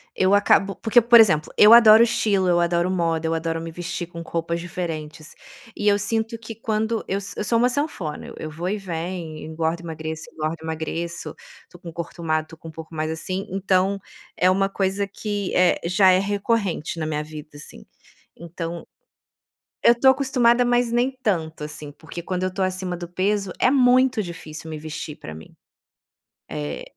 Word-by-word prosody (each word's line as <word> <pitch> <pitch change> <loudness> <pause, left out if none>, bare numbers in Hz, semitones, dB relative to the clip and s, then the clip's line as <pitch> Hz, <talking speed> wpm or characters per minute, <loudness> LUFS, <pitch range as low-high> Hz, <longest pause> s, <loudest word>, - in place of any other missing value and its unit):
eu 190 +2 +3
acabo 200 -1 +3
porque, 235 +2 +4
por 235 +1 +7
exemplo, 155 -9 +4
eu 210 +2 +9
adoro 225 -1 +9
estilo, 200 -5 +1
eu 175 -1 +3
adoro 170 +1 +1
moda, 165 -3 0
eu 160 - 0
adoro 165 0 -2
me 165 0 -6
vestir 175 +1 -5
com 170 0 -9
roupas 170 0 -3
diferentes. 160 -3 -6 0.4
E 210 - -2
eu 205 - +5
sinto 225 +2 -2
que, 225 0 -8
quando 220 0 -2
eu 195 - -1 0.2
eu - - -3
sou 230 - +2
uma 245 +2 +4
sanfona, 245 - -3
eu - - -10
eu 155 - -6
vou 170 +4 -4
e 210 - -1
venho, 170 -3 -5
engordo 160 +2 -3
e - - -15
emagreço, 160 +4 -6
engordo 155 +1 -3
e - - -12
emagreço. 165 +2 -4 0.3
Tô 175 - -16
com 170 -2 -9
corpo 170 +1 -7
magro, 155 -1 0
tô 160 - -12
com 165 - -12
o - - -9
corpo 155 - -28
um - - -11
pouco 160 - -14
mais 155 0 -2
assim, 185 +4 -4
então 195 +1 +1 0.4
é 185 +1 +4
uma 195 +1 +1
coisa 195 0 -1
que 205 -1 -4
é 180 -1 +4
já 185 +2 +5
é 185 - +4
recorrente 200 -4 -1
na 155 - -2
minha 150 -1 -2
vida, 150 -1 -10
assim. 145 - -10 0.5
Então, 170 0 -7 1.0
eu 235 - +6
tô 265 - +6
acostumada, 250 -3 +3
mas 245 -1 +2
nem 240 +3 +1
tanto 160 -7 -1
assim, 150 -1 -7
porque, 160 +3 -9
quando 185 0 -3
eu 185 - -2
tô 195 - -3
acima 185 -1 -2
do 175 0 -7
peso, 195 +2 -1
é - - +4
muito 255 -2 +4
difícil 160 -2 -8
me 155 - -5
vestir, 155 -1 -6
pra 80 - -9
mim. 80 - -13 1.0
É. 75 0 -4
180 Hz, 195 wpm, -23 LUFS, 160-210 Hz, 1.0 s, eu